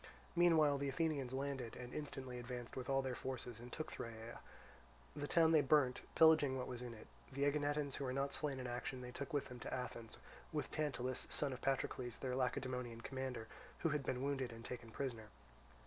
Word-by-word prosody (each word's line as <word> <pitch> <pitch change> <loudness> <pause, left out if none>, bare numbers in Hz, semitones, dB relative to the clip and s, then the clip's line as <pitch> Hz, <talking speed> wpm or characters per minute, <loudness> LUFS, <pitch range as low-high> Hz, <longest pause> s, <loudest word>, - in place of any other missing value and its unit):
Meanwhile 160 -5 +6
the 140 0 0
Athenians 140 -3 0
landed, 135 -3 -2
and 125 -1 -7
instantly 130 -4 -4
advanced 120 0 -5
with 130 +1 -4
all 135 0 +3
their 130 -1 -1
forces 125 -2 -4
and 120 +1 -9
took 155 - -4
Thyrea. 115 0 -6 0.8
The 145 0 -2
town 165 0 +6
they 155 -2 +7
burnt, 130 -2 +4
pillaging 155 -4 +7
what 125 - -1
was 125 -1 -5
in 120 -2 -5
it; 110 - -11 0.3
the 140 +1 0
Aeginetans 145 0 +2
who 140 - -2
were 130 - 0
not 135 +2 0
slain 145 -4 -1
in 125 - -4
action 125 +1 -3
they 125 0 -6
took 140 +2 -5
with 145 -2 +1
them 125 -1 -7
to - - -5
Athens, 120 -3 -4 0.3
with 150 -1 -2
Tantalus, 130 -4 -1
son 140 -3 +2
of 130 - -7
Patrocles, 130 -2 0
their 130 -2 -2
Lacedaemonian 125 -2 -1
commander, 130 -3 -3 0.3
who 165 - +3
had 150 -2 +1
been 130 0 -1
wounded 135 -3 0
and 115 0 -9
taken 120 -2 -5
prisoner. 115 -2 -3
130 Hz, 195 wpm, -40 LUFS, 125-145 Hz, 0.8 s, they